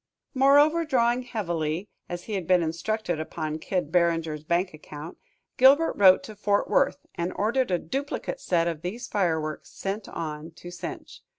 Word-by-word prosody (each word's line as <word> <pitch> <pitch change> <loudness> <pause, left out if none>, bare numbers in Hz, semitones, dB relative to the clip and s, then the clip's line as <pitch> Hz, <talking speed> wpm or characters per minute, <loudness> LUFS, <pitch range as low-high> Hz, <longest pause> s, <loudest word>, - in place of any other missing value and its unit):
Moreover, 290 +5 +5
drawing 245 -5 +2
heavily, 175 -7 -3 0.2
as 175 0 -5
he 220 - -6
had 185 -5 -3
been 180 -2 +4
instructed, 175 +2 -2
upon 155 -1 -4
Kid 180 -3 -2
Barringer's 165 -3 +1
bank 175 +3 0
account, 155 +1 -10 0.4
Gilbert 280 +5 +6
wrote 190 -2 +6
to 215 - -9
Fort 205 0 +1
Worth - - +1
and 175 +1 -2
ordered 240 +4 +1
a 180 - +2
duplicate 285 - -4
set 170 -2 +1
of 165 -3 -3
these 215 +8 -5
fireworks 160 - -1
sent 200 +2 -5
on 155 0 -6
to 175 +1 -10
Cinche. 175 - -8
180 Hz, 160 wpm, -26 LUFS, 165-230 Hz, 0.4 s, Gilbert